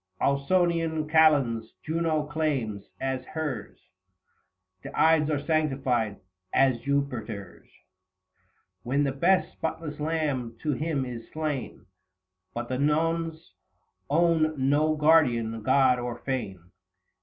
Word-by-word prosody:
Ausonian 160 +2 +1
Kalends 140 -8 +3
Juno 160 -1 0
claims 140 -10 -2
as 130 -1 -2
hers: 135 -7 -5 1.0
The - - -8
Ides 160 -1 +4
are 145 -2 -1
sanctified 135 -9 0 0.3
as 130 -3 +3
Jupiter's, 125 -9 -3
60 - - -28 1.0
When 135 +4 0
the 140 - +1
best 180 +7 +2
spotless 160 -2 -5
lamb 145 -7 -2
to 155 - +1
him 150 -1 -1
is 120 -2 -8
slain: 155 -4 -4 0.7
But 120 0 -3
the 130 0 -2
Nones 160 - 0 0.6
own 160 0 +3
no 145 +4 +2
guardian 125 -8 +3
god 130 +1 +4
or 120 -1 -4
fane. 95 -10 -5
140 Hz, 110 wpm, -27 LUFS, 125-160 Hz, 1.0 s, Ides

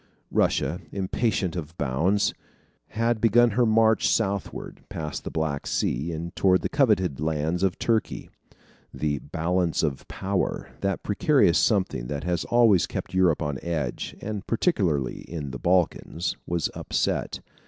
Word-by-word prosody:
Russia, - - +1
impatient 95 -1 -1
of 85 -1 -6
bounds, 80 +10 +1 0.5
had 115 0 0
begun 115 +1 +5
her 120 +3 +2
march 110 0 +4
southward, 100 -3 -2
past 75 -3 -5
the - - -4
Black 80 -3 -2
Sea, 75 +8 -1
and 85 +1 -5
toward 95 -1 +3
the - - -1
coveted 105 - +2
lands 80 +3 -1
of 95 -3 +1
Turkey. 115 -2 -1 0.6
The 75 -2 -1
"balance 85 +4 -1
of 75 -4 -2
power," 95 -1 -2
that 100 0 -2
precarious 105 - +3
something 95 - +1
that 70 +1 -4
has 90 +1 -1
always 115 -6 +4
kept - - -5
Europe 90 -4 +3
on 75 -3 -3
edge 85 -3 -3
and 105 -2 -5
particularly 90 - 0
in 75 -5 -5
the 65 - -6
Balkans 90 -1 0
was 85 -2 0
upset. - - -1
90 Hz, 140 wpm, -25 LUFS, 80-105 Hz, 0.6 s, begun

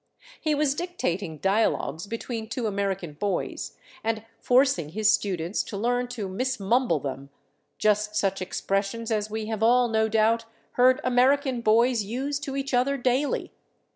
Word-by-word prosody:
He 310 -2 +1
was 290 -2 +2
dictating 200 - -3
dialogues 195 -3 0
between 225 0 -5
two 245 -1 -3
American 195 -5 -2
boys, 190 +4 -3 0.3
and 220 0 -2
forcing 250 - +3
his 215 +5 +3
students 185 -3 0
to 200 - -6
learn 245 +3 0
to 235 -5 -5
mismumble 235 - +1
them; 135 0 -6 0.5
just 210 0 +1
such 195 -2 0
expressions 195 +5 -2
as 215 -1 0
we 220 0 -3
have 220 -1 -4
all, 245 +2 +5
no 220 -1 +1
doubt, 225 +1 +2 0.3
heard 255 +1 +4
American 255 0 +2
boys 230 +2 +3
use 265 +7 -3
to 275 -2 -5
each 275 0 -3
other 260 +3 +2
daily. 260 +3 0
220 Hz, 145 wpm, -26 LUFS, 200-250 Hz, 0.5 s, all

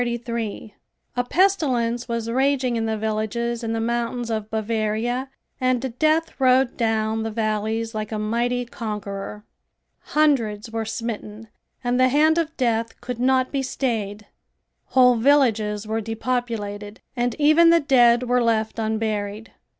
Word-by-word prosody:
A 245 - +1
pestilence 255 -11 +1
was 230 -1 -3
raging 260 0 +1
in 225 -1 -1
the 220 0 -1
villages 220 +2 -2
in 225 0 -2
the 225 - -1
mountains 235 +1 -2
of 215 -1 -3
Bavaria 220 +3 -1 0.3
and 255 -1 0
death 315 +1 +2
rode 255 0 +4
down 220 -1 0
the 225 - -2
valleys 220 +1 -2
like 215 0 -4
a 215 - -2
mighty 240 +3 -1
conqueror. 210 -2 -6 0.7
Hundreds 230 -8 +2
were 225 0 -2
smitten 220 -1 -5 0.3
and 245 +1 0
the 255 0 +5
hand 310 +4 +4
of 325 -1 -3
death 230 -3 -1
could 245 -1 -6
not 255 +1 +2
be 275 - -1
stayed. 215 -6 -3 0.6
Whole 250 -2 +4
villages 225 -5 +2
were 220 +1 -2
depopulated 220 -3 -4
and 245 -1 -1
even 310 +3 +5
the 335 0 +6
dead 245 -5 +4
were 250 0 +2
left 225 -1 0
unburied. 215 -1 -2
230 Hz, 135 wpm, -23 LUFS, 220-255 Hz, 0.7 s, the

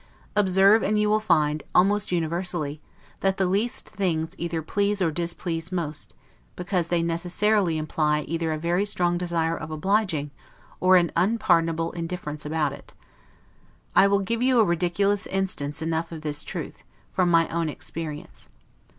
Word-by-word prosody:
Observe, 195 +2 +5
and 210 +1 +1
you 210 - +2
will 215 +1 +3
find, 155 -7 +1
almost 205 +2 +3
universally, 170 -3 -1 0.4
that 195 0 +1
the 190 - +2
least 200 +6 -1
things 165 -4 -1
either 170 -1 -2
please 200 +4 0
or 170 -4 +1
displease 170 0 -3
most; 155 -5 -4 0.4
because 180 -1 -1
they 170 -1 +1
necessarily 175 +2 +1
imply, 155 -1 0
either 165 +1 -2
a 155 - -1
very 170 +4 0
strong 175 -4 +1
desire 170 -2 0
of - - -7
obliging, 155 -2 0 0.5
or 185 0 +6
an 170 -2 +2
unpardonable 165 -4 +2
indifference 165 -3 -5
about 150 -2 0
it. - - -13 1.0
I 195 - +7
will 200 0 +2
give 230 +4 -2
you 255 0 +3
a 220 - +6
ridiculous 185 +4 +1
instance 160 -6 -2
enough 165 +1 -2
of 160 -2 -7
this 150 -1 -1
truth, - - -6 0.3
from 180 -1 +2
my 165 -1 +4
own 165 -1 -1
experience. 150 0 -7
170 Hz, 150 wpm, -25 LUFS, 160-195 Hz, 1.0 s, I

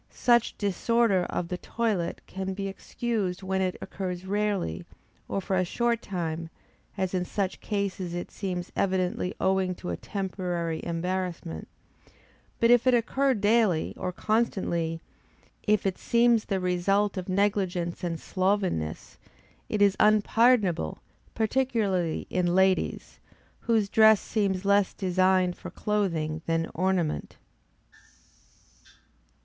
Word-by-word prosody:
Such 240 -2 +2
disorder 205 -1 +2
of 170 - -3
the 180 - -3
toilet 215 -7 -2
can 190 0 -4
be 195 0 -3
excused 195 -2 -3
when 190 0 -1
it 185 -1 -1
occurs 185 -1 -5
rarely, 200 - -1 0.4
or - - -1
for 190 - -1
a 185 - +3
short 235 +5 0
time, 165 -3 -4 0.5
as 190 -1 -1
in 180 -1 +1
such 190 +1 -3
cases 195 -4 -2
it 175 - -5
seems 180 -3 -4
evidently 185 -1 0
owing 190 -1 +1
to 180 - -5
a - - -1
temporary 180 -4 -3
embarrassment; 170 - -3 0.9
but 230 0 +4
if 245 +1 +5
it 255 - +6
occur 265 +3 +2
daily, 205 -5 +2
or 180 - -3
constantly; 175 -6 -1 0.7
if 210 -1 +3
it 190 -2 -1
seems 235 -1 +3
the 195 -2 -1
result 190 +3 +1
of 185 -1 -5
negligence 185 -3 0
and 165 -2 -2
slovenliness, 185 - -1 0.5
it 210 -1 +2
is 200 -1 +4
unpardonable, 215 - +3 0.4
particularly 220 -7 0
in 175 -1 +1
ladies, 190 0 +1 0.4
whose 225 -3 +1
dress 220 0 +6
seems 200 -3 -1
less 200 -1 +3
designed 185 -1 +2
for - - -9
clothing 165 -7 -1
than 165 0 0
ornament. 180 -3 -1
190 Hz, 120 wpm, -27 LUFS, 180-210 Hz, 0.9 s, it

